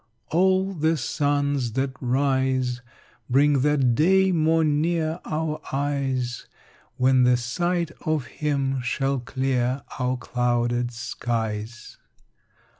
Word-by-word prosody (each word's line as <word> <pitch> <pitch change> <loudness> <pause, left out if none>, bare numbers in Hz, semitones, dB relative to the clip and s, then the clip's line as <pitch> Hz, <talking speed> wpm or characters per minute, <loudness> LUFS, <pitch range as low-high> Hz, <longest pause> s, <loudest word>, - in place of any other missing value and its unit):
All 190 +3 +2
the 160 -1 +1
suns 145 -1 0
that 135 +1 0
rise 130 -1 0 0.5
Bring 140 +2 +4
that 140 -4 +3
day 190 +7 +4
more 160 -1 +2
near 160 +2 0
our 155 0 -2
eyes 135 -3 -2 0.5
When 130 0 +4
the 125 0 +4
sight 170 +7 -1
of 155 -5 0
him 135 -1 -1
shall 135 +2 -1
clear 130 +1 -1 0.2
our 125 0 0
clouded 120 0 0
skies. 115 -1 -4
135 Hz, 105 wpm, -24 LUFS, 125-155 Hz, 0.5 s, Bring